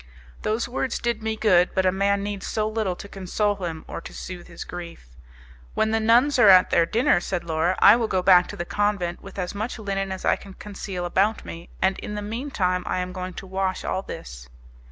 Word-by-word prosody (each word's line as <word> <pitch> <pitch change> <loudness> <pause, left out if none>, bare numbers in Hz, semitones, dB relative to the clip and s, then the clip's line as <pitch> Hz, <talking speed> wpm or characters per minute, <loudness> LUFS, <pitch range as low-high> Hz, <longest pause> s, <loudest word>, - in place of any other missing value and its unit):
Those 220 +2 -1
words 255 +1 -2
did 235 -2 -2
me 220 0 -2
good, 185 -5 +4
but 190 -1 +2
a 185 - +4
man 200 +1 +1
needs 205 -1 -4
so 215 -1 -1
little 215 -4 -1
to 200 - -9
console 200 +2 -1
him 165 -4 -5
or - - -6
to - - -10
soothe 180 -1 -8
his 170 - -8
grief. 170 - -9 0.7
"When 220 - +1
the 225 - +2
nuns 245 +5 +4
are 215 - +8
at 185 -1 +7
their 165 -1 +4
dinner," 225 -3 +3
said 180 -1 -3
Laura, 165 +2 0
"I 205 - +8
will 235 -2 0
go 185 -3 0
back 180 -1 +6
to - - -7
the 175 - -3
convent 200 -3 -1
with 195 - -12
as 180 -2 -3
much 215 +5 -4
linen 195 -3 -3
as 190 - -5
I - - +3
can 195 -1 -13
conceal 195 -3 -6
about 200 +5 +1
me, 170 +1 -9
and 190 0 +2
in 210 - -6
the 210 - -4
mean 230 +7 -4
time 180 -7 0
I - - -1
am 180 0 -3
going 185 -1 -6
to - - -7
wash 190 0 -2
all 190 - -1
this." - - -9
195 Hz, 230 wpm, -24 LUFS, 180-215 Hz, 0.7 s, are